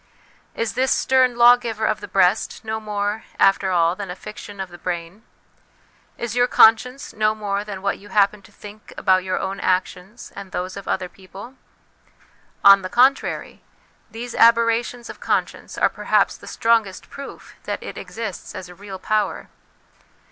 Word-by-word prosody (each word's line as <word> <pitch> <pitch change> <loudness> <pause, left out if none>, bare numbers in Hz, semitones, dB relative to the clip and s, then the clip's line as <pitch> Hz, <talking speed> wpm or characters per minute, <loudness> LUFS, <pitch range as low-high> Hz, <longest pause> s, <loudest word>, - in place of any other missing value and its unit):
Is 230 -1 -2
this 260 +1 +1
stern 255 -2 +3
lawgiver 240 -2 +4
of 215 -1 0
the - - -7
breast 195 +4 +1
no 220 0 -3
more, 210 0 -3 0.2
after 195 0 +3
all, 170 -1 +2
than 200 -1 -7
a 180 - -5
fiction 210 -1 -10
of 190 -1 -4
the 175 0 -13
brain? 175 +3 -5 1.0
Is 235 -1 -4
your 245 0 +3
conscience 250 +4 +4
no 215 0 +1
more 205 -1 -2
than 200 -2 -8
what 200 - -1
you 205 - -15
happen 205 0 +2
to - - -19
think 210 +1 -13
about 185 -1 +3
your 185 0 -2
own 195 +1 -4
actions 185 +4 -2
and 200 -1 -9
those 185 +1 -4
of 200 - -9
other 185 -1 -1
people? 195 +6 -12 1.1
On 200 0 +8
the 185 - -5
contrary, 260 +5 +1 0.5
these 230 +2 -7
aberrations 230 +1 +3
of - - -10
conscience - - -2
are - - +4
perhaps - - +1
the - - -14
strongest 225 -5 0
proof 280 0 -10
that - - -4
it - - -7
exists 220 -5 -7
as 180 - -7
a - - -11
real 195 +1 -9
power. 215 +2 -1
210 Hz, 165 wpm, -21 LUFS, 190-230 Hz, 1.1 s, On